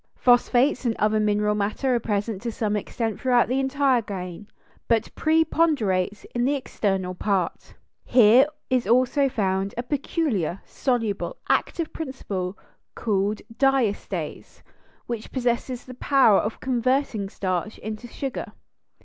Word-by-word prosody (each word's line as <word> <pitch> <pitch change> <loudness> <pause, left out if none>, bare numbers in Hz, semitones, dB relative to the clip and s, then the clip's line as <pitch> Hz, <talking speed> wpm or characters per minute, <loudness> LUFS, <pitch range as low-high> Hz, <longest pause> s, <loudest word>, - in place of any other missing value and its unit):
] - - -52
Phosphates 245 +2 +3
and 235 -3 0
other 215 +1 +2
mineral 210 0 +2
matter 210 +6 0
are 240 - +2
present 210 -2 -2
to 235 0 -3
some 210 -1 -1
extent 220 +1 -3
throughout 245 -2 +3
the 255 +2 0
entire 270 -2 +2
grain, 190 -1 -7 0.4
but 230 -1 +1
preponderates 300 - +1
in 240 - 0
the 280 +3 +2
external 195 -8 -2
part. 185 -1 -2 0.3
Here 245 +3 +6 0.2
is 250 -5 +1
also 255 +4 +3
found 195 -3 -1
a 240 - -1
peculiar, 255 - -1
soluble, 240 - -2
active 335 -2 0
principle 200 - -4 0.4
called 205 -1 -1
diastase, 265 -5 -1 0.4
which 235 -2 -5
possesses 245 0 -1
the 255 - -9
power 255 -5 +4
of 215 - -3
converting 255 -4 0
starch 185 +2 -3
into 215 +3 -6
sugar. 270 +2 -5
235 Hz, 130 wpm, -24 LUFS, 205-260 Hz, 0.4 s, Here